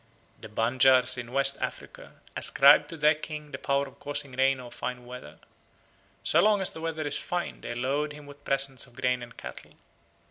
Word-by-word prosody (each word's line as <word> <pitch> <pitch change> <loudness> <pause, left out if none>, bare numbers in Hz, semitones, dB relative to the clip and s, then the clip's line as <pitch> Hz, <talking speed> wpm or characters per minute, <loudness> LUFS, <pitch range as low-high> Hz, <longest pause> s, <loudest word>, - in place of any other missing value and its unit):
The - - -11
Banjars 130 +3 +3
in 120 -1 -8
West 135 +1 +3
Africa - - -7 0.2
ascribe 140 +2 +6
to 165 - -9
their 150 0 +4
king 150 -1 -8
the - - -6
power 140 0 0
of 135 - -17
causing 145 -1 -3
rain 135 +1 +2
or 125 -1 -10
fine 125 -1 -6
weather. 125 +1 -10 0.9
So - - +4
long 210 -1 +4
as 190 - +2
the 160 - -9
weather 160 -1 -3
is 145 - -2
fine 175 0 -4
they 120 - -6
load 140 +5 -1
him 150 0 -11
with 145 0 -14
presents 135 -2 -1
of 120 - -20
grain 125 0 0
and 120 -1 -11
cattle. - - -10
135 Hz, 190 wpm, -27 LUFS, 125-150 Hz, 0.9 s, ascribe